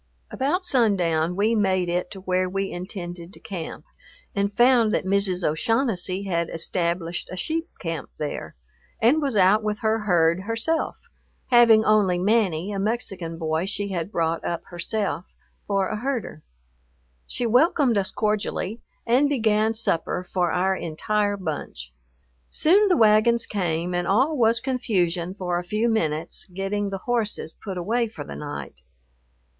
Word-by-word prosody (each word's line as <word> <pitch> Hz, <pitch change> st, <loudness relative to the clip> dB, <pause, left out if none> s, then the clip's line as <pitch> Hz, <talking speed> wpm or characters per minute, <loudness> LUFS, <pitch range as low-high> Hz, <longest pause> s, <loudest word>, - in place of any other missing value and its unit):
About 300 Hz, +8 st, 0 dB
sundown 180 Hz, -, +2 dB
we 210 Hz, +4 st, +2 dB
made 190 Hz, -4 st, +1 dB
it 180 Hz, +1 st, -1 dB
to 195 Hz, -, -9 dB
where 185 Hz, 0 st, 0 dB
we 195 Hz, +1 st, -2 dB
intended 175 Hz, -1 st, -7 dB
to -, -, -12 dB
camp 175 Hz, -6 st, -7 dB, 0.5 s
and 200 Hz, 0 st, 0 dB
found 240 Hz, -1 st, +4 dB
that -, -, -1 dB
Mrs. 190 Hz, -2 st, +1 dB
O'Shaughnessy 190 Hz, -, 0 dB
had 170 Hz, -4 st, -1 dB
established 170 Hz, 0 st, -2 dB
a -, -, -4 dB
sheep 325 Hz, -, -2 dB
camp 165 Hz, -5 st, -4 dB
there, 150 Hz, -1 st, -5 dB, 0.4 s
and 265 Hz, +8 st, +4 dB
was 275 Hz, -5 st, -1 dB
out 195 Hz, +3 st, +5 dB
with 210 Hz, 0 st, -3 dB
her 220 Hz, 0 st, +1 dB
herd 175 Hz, -4 st, +2 dB
herself, 230 Hz, +11 st, -1 dB, 0.6 s
having 230 Hz, -3 st, +6 dB
only 205 Hz, -4 st, +3 dB
Manny, 195 Hz, -2 st, +1 dB
a 200 Hz, -, -3 dB
Mexican 195 Hz, -6 st, -3 dB
boy 160 Hz, +2 st, -1 dB
she 200 Hz, 0 st, -2 dB
had 180 Hz, 0 st, -3 dB
brought 165 Hz, -3 st, -1 dB
up 170 Hz, -, -3 dB
herself, 185 Hz, +1 st, -2 dB, 0.4 s
for 195 Hz, -2 st, +1 dB
a 215 Hz, -, -2 dB
herder. 245 Hz, -, -3 dB, 0.9 s
She 245 Hz, -, -2 dB
welcomed 255 Hz, +1 st, +3 dB
us 195 Hz, -2 st, 0 dB
cordially 210 Hz, 0 st, -2 dB, 0.2 s
and 255 Hz, +5 st, +3 dB
began 220 Hz, -4 st, +2 dB
supper 180 Hz, -5 st, 0 dB
for 180 Hz, -1 st, -1 dB
our 190 Hz, +1 st, +1 dB
entire 205 Hz, +5 st, -1 dB
bunch. 145 Hz, -, -6 dB, 0.6 s
Soon 390 Hz, -, +4 dB
the 360 Hz, -, +4 dB
wagons 225 Hz, +2 st, +4 dB
came, 175 Hz, -3 st, -2 dB
and 175 Hz, 0 st, -1 dB
all 260 Hz, +10 st, +3 dB
was 230 Hz, -3 st, +3 dB
confusion 185 Hz, -9 st, -1 dB
for 180 Hz, -3 st, -1 dB
a -, -, -5 dB
few 215 Hz, +6 st, 0 dB
minutes 165 Hz, -8 st, -1 dB
getting 195 Hz, +2 st, -2 dB
the 195 Hz, -1 st, -6 dB
horses 220 Hz, -9 st, -1 dB
put 195 Hz, -3 st, -5 dB
away 230 Hz, +7 st, 0 dB
for 215 Hz, -9 st, -8 dB
the -, -, -8 dB
night. 145 Hz, -, -7 dB
200 Hz, 150 wpm, -24 LUFS, 175-225 Hz, 0.9 s, having